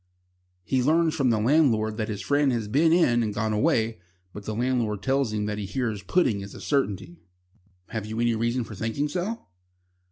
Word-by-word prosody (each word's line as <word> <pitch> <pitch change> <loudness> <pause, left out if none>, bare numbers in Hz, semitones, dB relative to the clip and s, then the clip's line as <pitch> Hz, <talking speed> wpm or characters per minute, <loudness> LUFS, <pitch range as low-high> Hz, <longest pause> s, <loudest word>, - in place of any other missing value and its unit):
He 130 +6 0
learns 160 +4 +3
from 135 -5 +1
the 110 -2 +2
landlord 110 -4 +2
that 110 -2 -2
his 105 -2 -4
friend 145 -1 +2
has 115 -3 -2
been 150 +9 +3
in 145 -9 +4
and 105 -3 -2
gone 110 0 0
away, 110 +1 +1 0.3
but 105 -1 -9
the 110 - -3
landlord 120 -4 -1
tells 135 -3 +1
him 105 -1 -2
that 105 0 -3
he 100 - -4
hears 110 -2 -2
Pudding 105 - +1
is 100 0 -9
a - - -9
certainty. 95 - -2 0.7
"Have 110 -2 -4
you 110 +1 -4
any 120 0 +2
reason 115 +2 0
for 110 - -9
thinking 115 +8 -2
so?" 185 +8 -4
115 Hz, 195 wpm, -26 LUFS, 105-135 Hz, 0.7 s, in